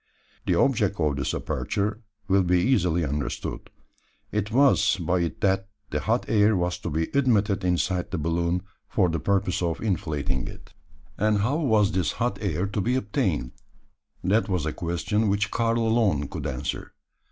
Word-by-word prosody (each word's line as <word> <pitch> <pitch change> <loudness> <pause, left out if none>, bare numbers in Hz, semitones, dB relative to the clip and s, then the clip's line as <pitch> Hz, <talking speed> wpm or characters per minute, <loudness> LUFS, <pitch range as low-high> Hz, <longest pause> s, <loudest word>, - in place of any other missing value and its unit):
The - - +3
object 105 -8 +2
of 75 -3 +1
this 70 - -1
aperture 105 +2 -2 0.3
will 95 0 +4
be 90 0 +2
easily 90 -7 +2
understood. 70 -1 -4 0.6
It 105 -1 -1
was 135 -5 +4
by 90 +1 0
it 85 -1 -3
that 95 0 +1 0.2
the - - 0
hot - - 0
air 105 0 +4
was 90 0 -1
to - - -4
be 80 +1 0
admitted 105 -7 +2
inside 90 0 0
the 95 - -3
balloon, 85 +3 0 0.2
for 95 -4 +2
the 80 0 -1
purpose 100 -3 0
of 85 -2 -1
inflating 80 - -2
it. - - -12 0.5
And 105 +1 +3
how 130 +9 +1
was 110 -10 +3
this 90 -5 0
hot - - -1
air 90 - -1
to 100 +1 -2
be 125 +6 +1
obtained? 100 - -1 0.7
That 105 +5 +2
was 90 -5 0
a 80 - -2
question 90 +5 -1
which 100 +2 0
Karl 115 0 +1
alone 110 - +2
could - - -4
answer. 65 - -4
95 Hz, 165 wpm, -25 LUFS, 85-105 Hz, 0.7 s, will